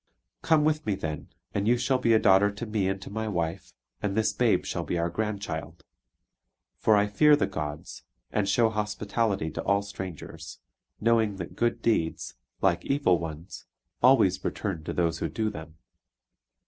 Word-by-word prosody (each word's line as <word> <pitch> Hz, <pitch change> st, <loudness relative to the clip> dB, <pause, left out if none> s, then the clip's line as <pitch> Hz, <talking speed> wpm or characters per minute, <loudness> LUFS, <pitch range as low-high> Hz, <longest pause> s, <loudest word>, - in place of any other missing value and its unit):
Come 160 Hz, -2 st, +3 dB
with 155 Hz, -2 st, 0 dB
me 105 Hz, -, +1 dB
then, 75 Hz, -4 st, -5 dB, 0.3 s
and 100 Hz, +1 st, -1 dB
you 120 Hz, +1 st, +4 dB
shall 130 Hz, +1 st, +1 dB
be 115 Hz, -2 st, +3 dB
a -, -, +7 dB
daughter 100 Hz, 0 st, +5 dB
to 100 Hz, +3 st, -6 dB
me 105 Hz, -3 st, -1 dB
and 95 Hz, 0 st, -1 dB
to -, -, -9 dB
my 110 Hz, +1 st, -3 dB
wife, 85 Hz, -2 st, -3 dB, 0.3 s
and 100 Hz, 0 st, -2 dB
this 110 Hz, -, +2 dB
babe -, -, +2 dB
shall -, -, -3 dB
be 85 Hz, -, -2 dB
our 85 Hz, 0 st, -1 dB
grandchild. 100 Hz, -7 st, -4 dB, 1.0 s
For 110 Hz, -, +4 dB
I 100 Hz, 0 st, +4 dB
fear 150 Hz, +9 st, +5 dB
the 145 Hz, -, +1 dB
gods, 75 Hz, -1 st, -6 dB, 0.3 s
and 100 Hz, -2 st, 0 dB
show 115 Hz, +2 st, +3 dB
hospitality 105 Hz, -4 st, -1 dB
to -, -, -4 dB
all 100 Hz, 0 st, +2 dB
strangers; 95 Hz, -5 st, -8 dB, 0.4 s
knowing 110 Hz, -2 st, +2 dB
that 90 Hz, -3 st, -7 dB
good 120 Hz, 0 st, 0 dB
deeds, 85 Hz, -8 st, 0 dB, 0.3 s
like -, -, +2 dB
evil 135 Hz, -, +2 dB
ones, 80 Hz, +2 st, -8 dB, 0.3 s
always 125 Hz, -7 st, +4 dB
return 95 Hz, -7 st, -3 dB
to -, -, -3 dB
those 85 Hz, -2 st, 0 dB
who 80 Hz, -, -2 dB
do 110 Hz, +7 st, -1 dB
them." 80 Hz, -4 st, -10 dB
100 Hz, 175 wpm, -27 LUFS, 85-115 Hz, 1.0 s, a